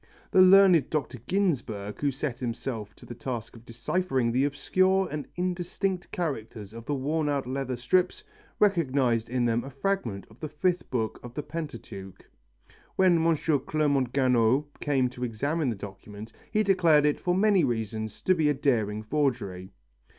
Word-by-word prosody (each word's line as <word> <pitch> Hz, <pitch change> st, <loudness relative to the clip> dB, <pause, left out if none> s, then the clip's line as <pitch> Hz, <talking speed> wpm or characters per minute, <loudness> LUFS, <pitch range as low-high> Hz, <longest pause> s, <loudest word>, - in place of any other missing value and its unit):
The 185 Hz, -, +6 dB
learned 185 Hz, -5 st, +7 dB
Dr. 140 Hz, -5 st, -2 dB
Ginsburg, 125 Hz, -, -1 dB
who 145 Hz, -, +2 dB
set 135 Hz, -1 st, -4 dB
himself 115 Hz, -3 st, -4 dB
to -, -, -15 dB
the -, -, -8 dB
task 120 Hz, -1 st, -5 dB
of 115 Hz, 0 st, -15 dB
deciphering 125 Hz, +1 st, -1 dB
the 130 Hz, +4 st, +2 dB
obscure 185 Hz, +7 st, +2 dB
and 150 Hz, -1 st, -4 dB
indistinct 180 Hz, +1 st, -2 dB
characters 115 Hz, -, -4 dB
of 115 Hz, 0 st, -9 dB
the 145 Hz, -, -1 dB
worn 150 Hz, +3 st, -1 dB
out 140 Hz, -2 st, -1 dB
leather 130 Hz, 0 st, -3 dB
strips, 185 Hz, -, +1 dB, 0.3 s
recognized 135 Hz, -, +2 dB
in 125 Hz, 0 st, 0 dB
them 115 Hz, 0 st, +1 dB
a 135 Hz, -, -7 dB
fragment 135 Hz, -, -2 dB
of 110 Hz, -, -18 dB
the 155 Hz, -, -5 dB
fifth 175 Hz, +4 st, -1 dB
book 115 Hz, -3 st, -2 dB
of 120 Hz, 0 st, -10 dB
the 150 Hz, -, -3 dB
Pentateuch. 120 Hz, -, -8 dB, 0.7 s
When 180 Hz, -3 st, +4 dB
M. 165 Hz, -1 st, +3 dB, 0.3 s
Clermont 140 Hz, -5 st, +1 dB
Ganneau 130 Hz, 0 st, +3 dB
came 135 Hz, -3 st, +1 dB
to 125 Hz, 0 st, -7 dB
examine 140 Hz, +6 st, -1 dB
the 115 Hz, -, -2 dB
document 100 Hz, +2 st, -10 dB, 0.2 s
he 215 Hz, 0 st, +2 dB
declared 170 Hz, -7 st, +4 dB
it 150 Hz, -, +1 dB
for 180 Hz, 0 st, 0 dB
many 200 Hz, -3 st, +4 dB
reasons 110 Hz, -3 st, -3 dB
to 185 Hz, -, +4 dB
be 160 Hz, -4 st, +2 dB
a 145 Hz, -, +1 dB
daring 110 Hz, -7 st, 0 dB
forgery. 110 Hz, -9 st, -2 dB
135 Hz, 165 wpm, -27 LUFS, 115-165 Hz, 0.7 s, learned